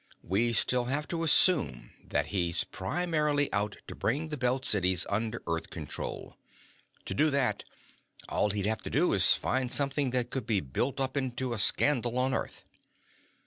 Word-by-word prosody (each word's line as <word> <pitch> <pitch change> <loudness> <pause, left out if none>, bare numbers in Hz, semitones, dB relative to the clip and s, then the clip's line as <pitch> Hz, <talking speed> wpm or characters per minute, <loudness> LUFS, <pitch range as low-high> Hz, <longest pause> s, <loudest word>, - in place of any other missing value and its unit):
We 110 +6 0
still 125 +2 +1
have 140 +4 -2
to 170 -1 -3
assume 165 0 +4
that - - -1
he's 85 -3 0
primarily 150 - -1
out 105 +1 -1
to - - -8
bring 150 +8 -2
the 150 - -4
Belt 130 -1 -1
Cities 90 -3 +1
under 110 +3 -2
Earth 85 0 -3
control. 75 -4 -6 0.7
To - - -2
do 155 +1 +2
that, 140 -3 0 0.6
all 105 - 0
he'd 100 -1 -1
have 110 +1 -1
to - - -6
do - - +1
is - - +6
find 130 -1 -1
something 140 -1 +1
that 125 -1 -1
could 130 -4 -4
be 110 -4 +1
built 95 - -3
up 135 0 -1
into 130 -2 -2
a 115 - -3
scandal 120 +2 +3
on 130 +1 0
Earth." - - -4
125 Hz, 170 wpm, -29 LUFS, 105-140 Hz, 0.7 s, is